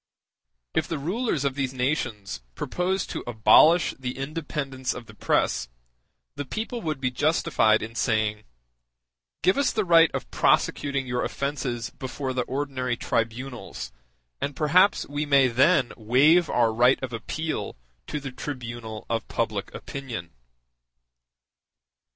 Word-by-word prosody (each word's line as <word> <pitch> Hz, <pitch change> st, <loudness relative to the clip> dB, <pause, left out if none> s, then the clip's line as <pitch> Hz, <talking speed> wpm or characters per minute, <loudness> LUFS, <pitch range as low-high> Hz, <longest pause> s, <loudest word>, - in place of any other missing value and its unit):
If -, -, 0 dB
the 165 Hz, -, -2 dB
rulers 170 Hz, -, -1 dB
of 140 Hz, -, +1 dB
these 135 Hz, -1 st, -2 dB
nations 120 Hz, -, -2 dB
propose 185 Hz, +2 st, -1 dB
to -, -, -5 dB
abolish 120 Hz, +9 st, +5 dB
the 125 Hz, -1 st, -4 dB
independence 140 Hz, -2 st, -3 dB
of 120 Hz, -, -8 dB
the -, -, -13 dB
press, -, -, 0 dB, 0.6 s
the 145 Hz, -, -4 dB
people 225 Hz, -, -4 dB
would 155 Hz, -6 st, -3 dB
be 130 Hz, -2 st, 0 dB
justified 125 Hz, -6 st, +2 dB
in 110 Hz, +1 st, -6 dB
saying: 110 Hz, -2 st, 0 dB, 1.0 s
Give 190 Hz, +9 st, +4 dB
us 280 Hz, -, +2 dB
the 215 Hz, -3 st, 0 dB
right 165 Hz, -2 st, +6 dB
of -, -, -5 dB
prosecuting 140 Hz, -2 st, +1 dB
your 125 Hz, -1 st, -1 dB
offences 135 Hz, -4 st, -3 dB
before 130 Hz, 0 st, -5 dB
the 125 Hz, -, 0 dB
ordinary 130 Hz, -3 st, -2 dB
tribunals, 115 Hz, -, -3 dB, 0.5 s
and 145 Hz, -, -2 dB
perhaps 180 Hz, +6 st, +3 dB
we 145 Hz, +1 st, -3 dB
may 140 Hz, -2 st, +5 dB
then 130 Hz, +2 st, +3 dB
waive 145 Hz, +10 st, +4 dB
our 115 Hz, -2 st, +2 dB
right 125 Hz, +3 st, +4 dB
of 125 Hz, -2 st, -4 dB
appeal 155 Hz, +8 st, -3 dB, 0.3 s
to 150 Hz, -, -3 dB
the 135 Hz, -2 st, -6 dB
tribunal 120 Hz, -5 st, -6 dB
of 115 Hz, -1 st, -2 dB
public 110 Hz, -3 st, -2 dB
opinion. 120 Hz, -11 st, -7 dB
135 Hz, 135 wpm, -26 LUFS, 120-150 Hz, 1.0 s, right